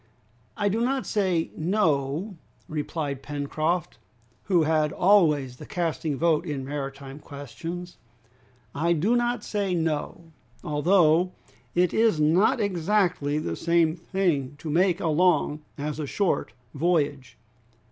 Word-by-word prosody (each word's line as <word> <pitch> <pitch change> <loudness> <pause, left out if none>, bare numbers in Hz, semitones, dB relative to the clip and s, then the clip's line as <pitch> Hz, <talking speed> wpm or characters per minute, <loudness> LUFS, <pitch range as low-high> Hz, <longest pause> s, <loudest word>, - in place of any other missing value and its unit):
"I 205 - +1
do 215 +3 0
not 260 +2 0
say 185 -6 0
no," 165 0 0 0.3
replied 150 -2 -3
Pencroft, 155 +4 -2 0.5
who 180 -5 +3
had 155 -1 +2
always 150 -10 +3
the - - -10
casting 160 -4 -2
vote 165 0 +2
in 145 -6 -4
maritime 140 0 -6
questions; 160 +6 -8 0.8
"I 170 +4 +1
do 190 +9 +2
not 240 -2 0
say 200 -3 -1
no, 165 0 -3 0.3
although 170 +3 +3 0.4
it 180 0 +2
is 220 -7 +3
not 185 - +3
exactly 180 -6 +1
the 85 - -2
same 170 - +2
thing 170 -6 -1
to 155 0 -5
make 180 +2 +2
a 170 - -1
long 155 -2 +2 0.2
as 150 +1 -4
a 150 - -3
short 195 +5 -1 0.2
voyage! 145 -4 0
165 Hz, 125 wpm, -26 LUFS, 145-185 Hz, 0.8 s, who